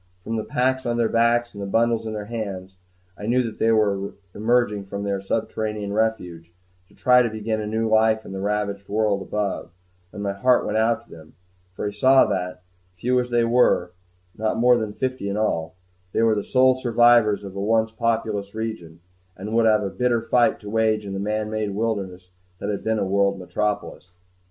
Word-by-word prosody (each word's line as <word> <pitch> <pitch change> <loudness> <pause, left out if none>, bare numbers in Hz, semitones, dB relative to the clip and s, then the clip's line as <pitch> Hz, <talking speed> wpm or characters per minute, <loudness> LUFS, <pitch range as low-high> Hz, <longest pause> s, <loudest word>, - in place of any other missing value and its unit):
From 115 - -3
the 110 - -2
packs 130 +2 0
on 120 0 0
their 115 -1 +2
backs 120 +1 +2
and 100 - -8
the 100 - -4
bundles 115 +2 +1
in 110 - -4
their 105 -1 -5
hands, 100 -4 -6 0.4
I 105 - -7
knew 125 +2 +2
that 115 -2 -6
they 115 - +3
were 100 -3 +1 0.2
emerging 110 -2 +1
from 100 +1 -5
their 100 -1 -2
subterranean 105 0 -3
refuge, 90 -7 -2 0.4
to - - -23
try 125 0 +5
to 120 - +1
begin 110 0 -3
a 105 - -4
new 110 +1 -1
life 110 0 +3
in - - -9
the 95 - -5
ravaged 100 -1 -2
world 105 -1 +1
above; 105 0 -3 0.4
and 100 - -7
my 100 -1 -1
heart 125 +5 +2
went 110 - 0
out 115 +1 +1
to - - -24
them, 80 -1 -14 0.4
for - - -4
I - - -3
saw 130 +6 +5
that, 90 0 -3 0.3
few 125 +8 +1
as 125 0 -2
they 120 -1 +2
were 115 -7 +3 0.4
not 110 +1 -1
more 125 +2 +5
than 110 -3 -2
fifty 130 -3 -3
in 100 - -2
all 85 -6 -1 0.4
they 115 - +2
were 115 -1 +4
the 105 -1 -1
sole 130 0 +4
survivors 120 -4 +3
of 100 -1 -9
a 100 - -3
once 110 +2 +1
populous 110 -3 -2
region, 110 -8 -6 0.4
and 105 +4 -6
would 115 0 +4
have 105 -1 +3
a 100 - -3
bitter 120 +3 0
fight 120 +1 +2
to 105 - -8
wage 110 -1 +1
in 100 - -5
the 95 - -3
man 105 +1 -2
made 105 -2 -2
wilderness 95 -5 -3 0.3
that 100 - -5
had 100 - -4
been 110 0 0
a - - 0
world 100 +1 +1
metropolis. 100 0 -3
110 Hz, 205 wpm, -23 LUFS, 100-115 Hz, 0.4 s, try